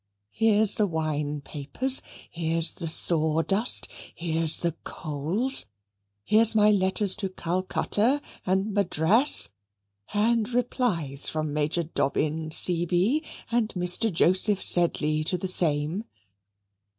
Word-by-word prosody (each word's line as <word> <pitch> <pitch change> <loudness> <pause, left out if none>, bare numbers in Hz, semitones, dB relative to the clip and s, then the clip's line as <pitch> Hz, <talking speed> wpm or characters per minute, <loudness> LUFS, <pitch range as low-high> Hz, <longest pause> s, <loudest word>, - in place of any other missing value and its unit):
Here's 220 -2 +3
the 210 - +1
wine 150 -3 -4
papers, 150 - -3 0.3
here's 165 0 0
the 165 -3 -7
sawdust, 165 +7 +3 0.3
here's 165 -1 -1
the 170 - -1
coals; 165 - -2 0.6
here's 220 - +2
my 210 0 +4
letters 190 0 0
to 200 -3 -4
Calcutta 185 - -1 0.2
and 190 +3 -2
Madras, 200 - +3 0.6
and 225 +2 0
replies 210 - -2
from 155 -2 -4
Major 150 +3 -1
Dobbin, 155 +1 -3
C.B., 175 - +3 0.3
and 230 -2 0
Mr. 180 +5 +2
Joseph 185 +4 +2
Sedley 155 -3 +1
to 180 +4 0
the 190 - -5
same. 165 +2 0
180 Hz, 105 wpm, -25 LUFS, 160-210 Hz, 0.6 s, my